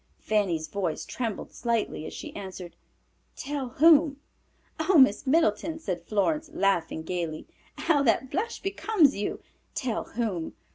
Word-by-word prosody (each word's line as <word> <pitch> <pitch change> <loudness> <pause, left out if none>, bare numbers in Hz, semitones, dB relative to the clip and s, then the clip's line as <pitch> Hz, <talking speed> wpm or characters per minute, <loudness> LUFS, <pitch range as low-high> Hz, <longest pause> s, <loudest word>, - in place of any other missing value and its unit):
Fanny's 185 -7 0
voice 185 -6 -3
trembled 230 -5 -4
slightly 230 -9 -1
as - - -8
she - - -8
answered, 190 -3 -8 0.6
"Tell 280 -2 -4
whom?" 305 +1 +5 0.6
"Oh, 335 +3 +3
Miss 260 -1 +5
Middleton," 315 +1 +2
said 185 - -4
Florence, 300 - 0
laughing 175 - 0
gayly, 165 -2 -3 0.3
"how 300 -4 +2
that 255 0 +2
blush 455 +5 -3
becomes 390 -6 +3
you! 205 - -3 0.3
Tell 245 -5 -2
whom? 210 -9 -3
230 Hz, 130 wpm, -27 LUFS, 190-305 Hz, 0.6 s, whom